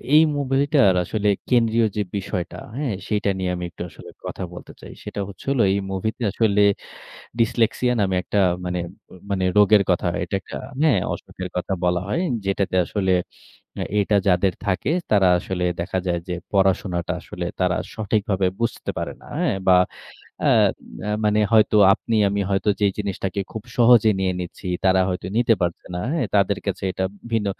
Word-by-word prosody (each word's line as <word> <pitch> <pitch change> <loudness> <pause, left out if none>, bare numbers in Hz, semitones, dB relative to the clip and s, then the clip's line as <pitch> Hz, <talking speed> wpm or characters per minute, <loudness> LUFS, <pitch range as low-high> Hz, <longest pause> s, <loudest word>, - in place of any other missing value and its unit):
এই 155 - +9 0.2
মুভিটার 135 -5 +3
আসলে 105 +3 -2 0.2
কেন্দ্রীয় 115 -2 +3
যে - - +2 0.2
বিষয়টা, 90 -2 -4 0.2
হ্যাঁ? 140 -7 -1
সেটা 105 -1 0
নিয়ে 90 -1 -1
আমি 90 0 -4
একটু 85 - -12
আসলে - - -13 0.2
কথা - - -5
বলতে - - -10
চাই। - - -10
সেটা - - -6
হচ্ছে 95 - -12
হল 135 - 0
এই 100 - +1
মুভিতে 110 +6 -3
আসলে 105 -2 +2 0.8
ডিসলেক্সিয়া 115 +2 +2
নামে 95 -2 +1
একটা 105 - -2 0.3
মানে 90 0 -2 0.5
মানে 95 -1 0
রোগের 105 0 +6
কথা। 90 0 +1 0.2
এটা - - -4
একটা - - -9 0.3
হ্যাঁ? 130 - +4
অসুখের 90 -1 -7
কথা 90 +2 -2
বলা 90 0 +2
হয়। 165 - 0 0.2
যেটাতে 95 -1 0
আসলে, 95 -1 0 0.9
এটা 105 +1 +2
যাদের 90 0 +3
থাকে 100 +9 0 0.2
তারা 100 -3 +5
আসলে 90 0 -3 0.2
দেখা 95 +2 -1
যায় 85 -1 0
যে 90 - -2 0.2
পড়াশোনাটা 95 -3 +1
আসলে 90 0 -6
তারা 90 -1 +2 0.2
সঠিকভাবে 100 -3 0
বুঝতে 115 +1 -2
পারে - - -3
না। - - -15
হ্যাঁ? - - +1
বা, 90 - +7 0.7
অ্যাঁ - - +5 0.6
মানে 105 0 +3
হয়তো 110 -1 +5 0.2
আপনি 115 +2 -1
আমি 100 +1 -1
হয়তো 100 +2 0
যেই 100 -2 +3
জিনিসটাকে 100 -1 -3
খুব 110 -2 -5
সহজে 115 -2 +6
নিয়ে 95 -1 +1
নিচ্ছি, 90 +2 -8 0.2
তারা 95 0 +4
হয়তো 90 0 -3
নিতে 120 -1 +4
পারছে 85 -1 -2
না। 90 - -3
হ্যাঁ? 155 -9 0
তাদের 100 0 +3
কাছে 100 - -3
এটা 95 - -2 0.3
ভিন্ন। 110 -3 +1
100 Hz, 165 wpm, -22 LUFS, 95-110 Hz, 0.9 s, এই